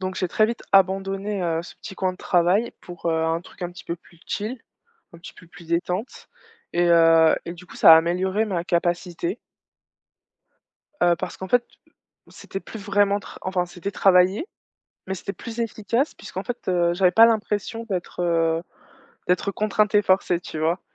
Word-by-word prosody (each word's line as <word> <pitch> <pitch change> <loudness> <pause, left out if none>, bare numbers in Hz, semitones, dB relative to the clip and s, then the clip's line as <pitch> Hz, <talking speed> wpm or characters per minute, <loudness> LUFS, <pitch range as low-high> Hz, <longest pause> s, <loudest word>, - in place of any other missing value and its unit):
Donc 185 0 -3
j'ai 185 - -1
très 215 +4 +3
vite 235 - -5
abandonné, 195 +1 +2
heu, 165 -1 -1
ce - - -12
petit - - -10
coin 185 -1 -1
de - - -13
travail 180 +7 +1
pour, 175 -1 -9
heu, 160 -1 +1
un 165 +1 0
truc 180 - -14
un 175 - -3
petit 180 - -12
peu 170 - -3
plus 170 0 -23
chill, 220 +5 -4 0.5
un 170 - -13
petit 170 - -11
peu 170 - -16
plus 170 0 -15
détente 180 +6 -3 0.4
et 175 0 +2
heu 165 -1 +6
et 170 - -5
du 180 +1 -14
coup - - -13
ça 165 - +8
a - - +8
amélioré 185 +5 0
ma 175 -4 -2
capacité 175 +1 -1 1.6
heu, 175 -1 +5
parce - - -5
qu'en 190 - -7
fait 245 -1 +3 0.6
c'était 195 - -8
plus 220 - -9
vraiment 200 0 +1
tra - - -12
enfin, 185 -1 -1
c'était 175 +3 -6
travailler, 190 - +3 0.6
mais 190 - -2
c'était 195 +2 -6
plus 230 -1 -8
efficace, 230 +4 -1
puisqu'en 190 - -7
fait, 245 -1 -4
heu, 175 -1 +2
j'avais 180 0 +3
pas 225 +4 +8
l'impression 225 0 -1
d'être, 180 -1 -4
heu, 165 -1 +1 0.7
d'être 180 +3 +1
contrainte 210 +1 0
et 205 - +5
forcée, 185 -2 +2
tu 155 - -7
vois? 165 +3 0
185 Hz, 185 wpm, -23 LUFS, 170-205 Hz, 1.6 s, ça